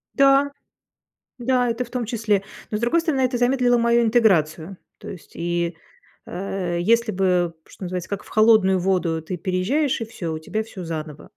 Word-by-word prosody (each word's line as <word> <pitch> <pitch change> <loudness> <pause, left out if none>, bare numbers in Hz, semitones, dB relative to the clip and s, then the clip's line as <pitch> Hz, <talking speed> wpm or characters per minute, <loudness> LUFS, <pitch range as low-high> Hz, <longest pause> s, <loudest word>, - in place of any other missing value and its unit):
Да. 275 0 +4 0.9
Да, 250 0 +1
это 230 +2 -2
в - - -18
том 250 -1 -2
числе. 215 -3 0 0.3
Но, 210 - -1
с 210 - -4
другой 240 +9 +2
стороны, 315 -5 0
это 255 -1 +1
замедлило 245 0 +3
мою 235 0 +3
интеграцию. 195 -7 +2 0.2
То - - -10
есть, 180 - -10
и, 170 0 -2 0.5
э, 180 -2 -3
если 230 +2 +2
бы, 180 -2 +1
что - - -11
называется, 180 -1 -5
"как 200 - -4
в - - -16
холодную 215 -4 +4
воду", 175 -3 0
ты 180 +3 -5
переезжаешь 205 - 0
и - - -1
всё, 170 -7 -5
у - - -4
тебя 215 +7 -3
всё 200 -4 -9
заново. 155 -2 -7
205 Hz, 180 wpm, -22 LUFS, 175-240 Hz, 0.9 s, Да